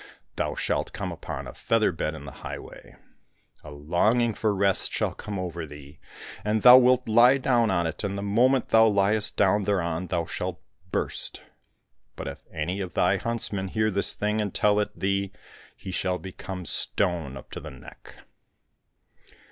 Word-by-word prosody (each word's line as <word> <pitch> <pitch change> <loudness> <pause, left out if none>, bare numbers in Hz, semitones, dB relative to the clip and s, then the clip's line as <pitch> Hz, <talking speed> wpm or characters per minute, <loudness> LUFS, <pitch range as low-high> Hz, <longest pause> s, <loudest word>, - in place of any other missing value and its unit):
Thou - - -2
shalt - - -1
come - - -4
upon - - -6
a - - -8
feather 115 -3 +1
bed 80 -1 -3
in 70 - -9
the 70 - -8
highway; - - -9 0.7
a 75 - -10
longing 90 +11 +1
for 110 +1 0
rest 100 -1 +1
shall - - -1
come 105 -1 -6
over 85 -3 -4
thee, 70 -1 -13 0.4
and 105 +1 0
thou 125 0 +11
wilt 125 0 +3
lie 120 +4 +6
down 120 -4 +2
on 85 -3 +1
it, 80 - -4
and 100 -1 -2
the 100 - -4
moment 125 +6 +2
thou 110 0 +6
Rest 105 +1 +1
down 105 +1 +3
thereon 90 -3 -1
thou 85 -1 -1
shalt 90 +2 -4 0.3
burst. - - -3 0.7
But - - -6
if - - -8
any 90 +6 -3
of 90 -3 -6
thy - - +3
huntsmen 105 -4 -2
hear 110 +2 0
this 100 +1 -1
thing 105 +1 0
and 105 -2 -2
tell 105 +2 +2
it 105 - -3
thee, 100 0 -1 0.4
he 95 - -7
shall 90 0 -1
become 95 -1 -7
stone 85 -10 -1
up 65 - -13
to - - -6
the - - -8
neck - - -14
100 Hz, 170 wpm, -26 LUFS, 90-110 Hz, 0.7 s, thou